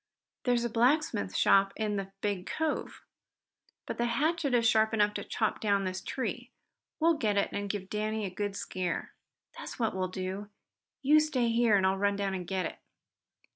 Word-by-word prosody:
There's 245 Hz, -2 st, +2 dB
a 240 Hz, -, 0 dB
blacksmith 240 Hz, -, +2 dB
shop 195 Hz, 0 st, +4 dB
in 215 Hz, -1 st, -1 dB
the 195 Hz, -1 st, -4 dB
big 200 Hz, -3 st, -2 dB
cove. 320 Hz, -1 st, -2 dB, 0.8 s
But -, -, -5 dB
the 240 Hz, -, +2 dB
hatchet 290 Hz, +3 st, +1 dB
is 230 Hz, -1 st, +4 dB
sharp 220 Hz, 0 st, +3 dB
enough 210 Hz, -1 st, +3 dB
to -, -, -4 dB
chop 220 Hz, -, -1 dB
down 200 Hz, -2 st, +2 dB
this 185 Hz, 0 st, -3 dB
tree. 245 Hz, -1 st, -4 dB, 0.5 s
We'll 330 Hz, +1 st, +4 dB
get 210 Hz, -3 st, +1 dB
it 200 Hz, -, +2 dB
and 205 Hz, 0 st, -3 dB
give 195 Hz, -2 st, -3 dB
Danny 215 Hz, +1 st, -2 dB
a 190 Hz, -, -4 dB
good 205 Hz, +1 st, -3 dB
scare." 185 Hz, -3 st, -3 dB, 0.5 s
"That's -, -, -7 dB
what 225 Hz, -3 st, 0 dB
we -, -, -3 dB, 0.3 s
will. 195 Hz, +2 st, -5 dB, 0.5 s
You 300 Hz, +3 st, +6 dB
stay 275 Hz, -6 st, +1 dB
here 230 Hz, -2 st, +4 dB
and 190 Hz, -, +2 dB
I'll 190 Hz, +1 st, +2 dB
run 200 Hz, 0 st, +2 dB
down 200 Hz, -1 st, -1 dB
and 180 Hz, -2 st, -4 dB
get 190 Hz, -2 st, -1 dB
it." -, -, -6 dB
210 Hz, 185 wpm, -30 LUFS, 195-240 Hz, 0.8 s, You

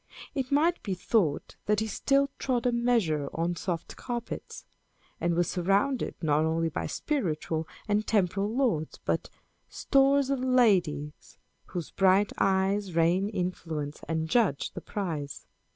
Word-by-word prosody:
It 265 Hz, -2 st, -3 dB
might 325 Hz, +5 st, +3 dB
be 195 Hz, -5 st, -3 dB
thought 180 Hz, -5 st, 0 dB
that 210 Hz, 0 st, +3 dB
he 220 Hz, -, 0 dB
still 275 Hz, +6 st, +1 dB
trod 250 Hz, -2 st, 0 dB
a 245 Hz, -, +3 dB
measure 225 Hz, -, +1 dB
on 170 Hz, +2 st, 0 dB
soft 170 Hz, -1 st, -4 dB
carpets, 240 Hz, -2 st, -6 dB, 0.5 s
and 170 Hz, 0 st, +1 dB
was 175 Hz, 0 st, +2 dB
surrounded, 200 Hz, +9 st, +1 dB
not 150 Hz, 0 st, +3 dB
only 165 Hz, +1 st, +1 dB
by 160 Hz, -, -3 dB
spiritual 160 Hz, -, -2 dB, 0.2 s
and 210 Hz, 0 st, +1 dB
temporal 200 Hz, -1 st, +1 dB
lords, 225 Hz, -, 0 dB
but -, -, -1 dB, 0.4 s
Stores 275 Hz, 0 st, +3 dB
of 275 Hz, -, 0 dB
ladies, 185 Hz, -, +1 dB, 0.3 s
whose 175 Hz, -3 st, -6 dB
bright 195 Hz, +1 st, +3 dB
eyes 195 Hz, -1 st, +1 dB
Rain 175 Hz, +4 st, +3 dB
influence, 165 Hz, -6 st, -4 dB
and 160 Hz, -1 st, -1 dB
judge 195 Hz, -, +1 dB
the -, -, -7 dB
prize. 155 Hz, -8 st, -4 dB
190 Hz, 135 wpm, -28 LUFS, 165-240 Hz, 0.5 s, might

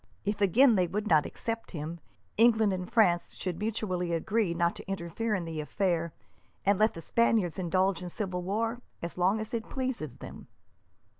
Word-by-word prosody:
If, 205 Hz, 0 st, -1 dB
again, 225 Hz, +4 st, +5 dB
they 180 Hz, -1 st, +3 dB
would 205 Hz, +5 st, -2 dB
not 155 Hz, -5 st, +4 dB
accept 230 Hz, -1 st, -4 dB
him, 160 Hz, +3 st, -5 dB, 0.4 s
England 220 Hz, -3 st, +4 dB
and 180 Hz, +2 st, -5 dB
France 185 Hz, -7 st, +3 dB
should 180 Hz, -3 st, -4 dB
mutually 195 Hz, -5 st, -1 dB
agree 195 Hz, +1 st, 0 dB
not 170 Hz, 0 st, +1 dB
to -, -, -10 dB
interfere 195 Hz, +4 st, -2 dB
in 180 Hz, -3 st, -3 dB
the 160 Hz, -2 st, -4 dB
affair, 170 Hz, 0 st, 0 dB, 0.5 s
and 200 Hz, 0 st, +3 dB
let 215 Hz, +1 st, +3 dB
the 165 Hz, -, -7 dB
Spaniards 220 Hz, -4 st, +2 dB
indulge 185 Hz, 0 st, +1 dB
in 180 Hz, -, -5 dB
civil 185 Hz, -1 st, -3 dB
war 225 Hz, +6 st, -1 dB, 0.2 s
as 170 Hz, +1 st, -5 dB
long 190 Hz, +5 st, +3 dB
as 220 Hz, +3 st, -6 dB
it 230 Hz, -1 st, -3 dB
pleases 255 Hz, -, -3 dB
them." -, -, -10 dB
190 Hz, 175 wpm, -29 LUFS, 170-220 Hz, 0.5 s, again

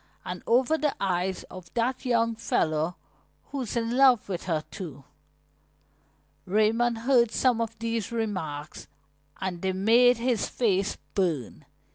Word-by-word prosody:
"And 180 Hz, 0 st, -5 dB
over 260 Hz, +7 st, +3 dB
the 295 Hz, -2 st, 0 dB
eyes 185 Hz, -1 st, -1 dB
of 180 Hz, -3 st, -12 dB
that 250 Hz, +3 st, -1 dB
young 230 Hz, -2 st, +2 dB
fellow 160 Hz, -6 st, 0 dB, 0.6 s
who's 265 Hz, -6 st, -4 dB
in 230 Hz, +1 st, -1 dB
love 260 Hz, -4 st, +5 dB
with 180 Hz, -3 st, -4 dB
her, 160 Hz, -4 st, -1 dB
too." 155 Hz, -8 st, -8 dB, 1.4 s
Raymond 225 Hz, +4 st, +2 dB
heard 235 Hz, 0 st, +3 dB
some 240 Hz, 0 st, +2 dB
of 230 Hz, 0 st, -3 dB
these 230 Hz, -1 st, -2 dB
remarks 185 Hz, -10 st, -4 dB, 0.5 s
and 180 Hz, -2 st, -4 dB
they 190 Hz, 0 st, 0 dB
made 235 Hz, +6 st, +5 dB
his 235 Hz, -2 st, 0 dB
face 200 Hz, -5 st, 0 dB, 0.2 s
burn. 165 Hz, -, -1 dB
220 Hz, 130 wpm, -27 LUFS, 185-240 Hz, 1.4 s, love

